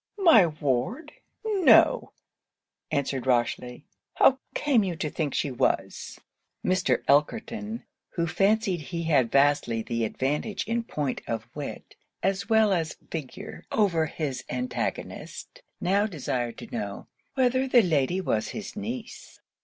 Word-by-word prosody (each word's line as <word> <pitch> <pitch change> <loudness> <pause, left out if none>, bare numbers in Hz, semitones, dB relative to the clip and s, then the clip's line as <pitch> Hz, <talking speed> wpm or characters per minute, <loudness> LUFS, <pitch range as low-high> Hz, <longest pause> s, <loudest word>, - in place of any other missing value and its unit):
'My 325 - +7
ward! 150 - -2 0.3
no,' 405 -5 +5 0.8
answered 135 -2 -1
Rochely, 125 +1 0 0.3
'how 265 0 +5 0.2
came 265 -7 +3
you 180 -3 -2
to 155 -2 -3
think 150 -4 -2
she 140 - 0
was?' 125 - -1 0.5
Mr. 185 -9 +1
Elkerton, 215 - +1 0.3
who 170 - +1
fancied 195 +2 +2
he 170 +4 -4
had 145 -8 +2
vastly 135 -5 +3
the 115 0 -2
advantage 145 - -1
in 230 +2 -1
point 145 - -3
of 115 -1 -3
wit, 145 -2 -7 0.3
as 195 +2 0
well 220 -2 +4
as 165 -3 -1
of - - -29
figure, 165 +7 -7
over 170 -7 +2
his 145 -4 -4
antagonist, 125 0 -4 0.2
now 200 +3 +2
desired 125 - -3
to - - -10
know, 100 -3 -4 0.3
'whether 260 0 +2
the 245 -3 +6
lady 165 +1 +1
was 110 - 0
his 215 -2 -7
niece? 230 +3 -7
165 Hz, 130 wpm, -27 LUFS, 130-215 Hz, 0.8 s, My